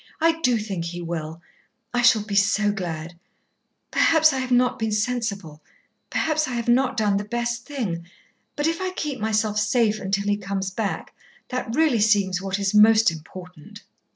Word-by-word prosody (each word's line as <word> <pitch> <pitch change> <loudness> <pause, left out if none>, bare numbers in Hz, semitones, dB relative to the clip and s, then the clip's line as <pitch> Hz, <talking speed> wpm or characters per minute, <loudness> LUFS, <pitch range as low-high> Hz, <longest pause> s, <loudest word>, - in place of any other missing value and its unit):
"I 325 0 +2
do 250 -5 +3
think 195 -6 -4
he 175 +1 -5
will. 165 0 -5 0.5
I 245 - +1
shall 230 -3 +5
be 210 -1 -7
so 205 +1 +3
glad. 170 -4 -6 0.7
Perhaps 315 -2 +4
I 265 - -1
have 260 -1 -3
not 250 0 +2
been 220 -1 -1
sensible, 210 -8 -2 0.5
perhaps 310 -1 0
I 255 - -4
have 235 -1 -3
not 255 +1 +2
done 205 -3 +2
the 200 - -2
best 240 +2 -3
thing, 195 - -4 0.5
but 295 - -1
if 330 +2 0
I 370 0 -2
keep 290 -7 -3
myself 215 -1 0
safe 215 -1 +1
until 195 +1 -1
he 205 0 +1
comes 195 -1 -3
back, 205 +1 -4 0.4
that 250 -2 -3
really 295 -8 +3
seems 200 -3 +2
what 195 0 -2
is 200 0 -1
most 215 -1 +6
important." 175 +1 -11
215 Hz, 175 wpm, -23 LUFS, 195-245 Hz, 0.7 s, most